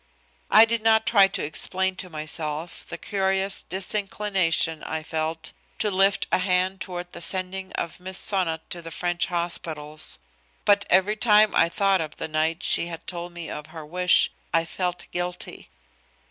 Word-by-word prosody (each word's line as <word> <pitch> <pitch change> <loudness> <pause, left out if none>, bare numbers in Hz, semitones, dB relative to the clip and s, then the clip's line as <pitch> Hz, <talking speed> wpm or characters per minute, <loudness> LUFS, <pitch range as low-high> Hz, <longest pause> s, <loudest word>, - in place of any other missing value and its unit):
I 225 - +8
did 230 0 0
not 220 0 +4
try 200 -4 +6
to 195 - -3
explain 190 +5 +1
to 185 - -5
myself 155 +1 -3
the - - -6
curious 195 -1 -1
disinclination 190 -4 -1
I 160 0 -4
felt 160 0 -3 0.2
to 210 - 0
lift 195 +1 +3
a - - +3
hand 185 +1 +1
toward 180 -1 -6
the - - -7
sending 190 +1 0
of 170 - -4
Miss 185 0 +2
Sonnot 175 -5 +1
to 175 - -5
the 165 - -8
French 175 +1 -1
hospitals. 160 -3 -2 0.5
But 205 0 +4
every 190 +4 +3
time 215 -1 +5
I 170 - +4
thought 195 0 +2
of 155 -2 -6
the - - -5
night 160 +3 -1
she 170 - +2
had 165 -1 -8
told 175 -1 -6
me 170 -2 -7
of 150 0 -7
her 160 -1 -9
wish 180 +3 +3 0.2
I 165 0 +2
felt 180 +1 -3
guilty. 175 0 -5
180 Hz, 165 wpm, -25 LUFS, 165-195 Hz, 0.5 s, I